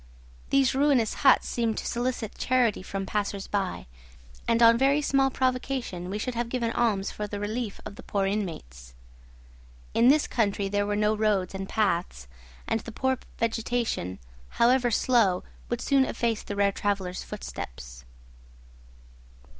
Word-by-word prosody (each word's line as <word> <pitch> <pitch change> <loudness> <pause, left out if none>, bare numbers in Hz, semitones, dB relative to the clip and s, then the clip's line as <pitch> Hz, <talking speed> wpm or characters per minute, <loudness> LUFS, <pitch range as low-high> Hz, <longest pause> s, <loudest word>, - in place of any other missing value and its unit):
These 275 -2 +3
ruinous 265 -5 +3
huts 270 -2 +5
seemed 230 -2 -1
to - - -4
solicit 240 -2 -2
charity 245 -6 +2
from 195 +1 -4
passers 200 0 -2
by; 195 -3 -2 0.6
and 230 0 +3
on 230 0 +8
very 270 +4 +3
small 275 -2 +2
provocation 255 -8 -2
we 200 - -3
should 250 +4 -3
have 235 0 -2
given 235 -2 -1
alms 215 -5 0
for 210 - -5
the 205 0 -5
relief 215 +1 -3
of 200 - -8
the - - -9
poor 200 -1 -1
inmates. 65 - -4 1.0
In 235 - +4
this 295 +3 +5
country 200 -4 0
there 205 +1 0
were 205 - 0
no 210 +1 +2
roads 210 -4 +1
and 195 0 -5
paths, 170 - -1 0.4
and 225 - 0
the 230 - -9
poor 260 +2 0 0.2
vegetation, 230 - -1 0.4
however 245 +1 +4
slow, 225 -6 +2 0.3
would 240 0 -2
soon 275 -1 +3
efface 230 -3 -1
the 205 - -6
rare 200 0 +3
travellers' 195 -3 -2
footsteps. - - -8
215 Hz, 150 wpm, -27 LUFS, 195-245 Hz, 1.0 s, on